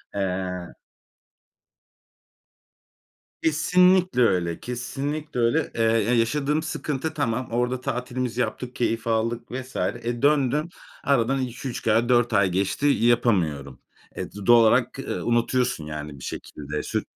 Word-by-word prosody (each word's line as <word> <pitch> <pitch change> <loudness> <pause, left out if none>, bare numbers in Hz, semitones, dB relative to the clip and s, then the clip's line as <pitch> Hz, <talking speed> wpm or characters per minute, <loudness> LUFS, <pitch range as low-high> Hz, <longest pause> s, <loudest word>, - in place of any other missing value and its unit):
Eee 90 -2 -3 2.7
Kesinlikle 180 0 +3
öyle. 85 -7 +2
Kesinlikle 135 +4 -4
öyle. 115 0 +1
Eee, 115 - -1
ya 115 0 +3
yaşadığım 145 +6 +1
sıkıntı 155 0 -3
tamam. 125 -4 -1
Orada 125 +2 0
tatilimizi 125 0 -2
yaptık, 125 0 -4
keyif 115 -1 -1
aldık 115 +1 -1
vs. 130 +1 -7
e, 120 +6 -2
döndün, 145 +2 +2 0.3
aradan 135 0 +2
2-3 125 0 -5
ay 115 +2 +3
4 120 -1 +3
ay 100 -1 +4
geçti. 95 +9 -1
Yapamıyorum. 95 - +1 0.4
E, - - -3
d 105 -1 -9
doğal 120 +1 +7
olarak, 110 - +3
eee, - - -4
unutuyorsun 120 -6 0
yani 75 -2 -7
bir - - -11
şekilde 75 0 -6
sür - - -2
120 Hz, 120 wpm, -24 LUFS, 105-135 Hz, 2.7 s, doğal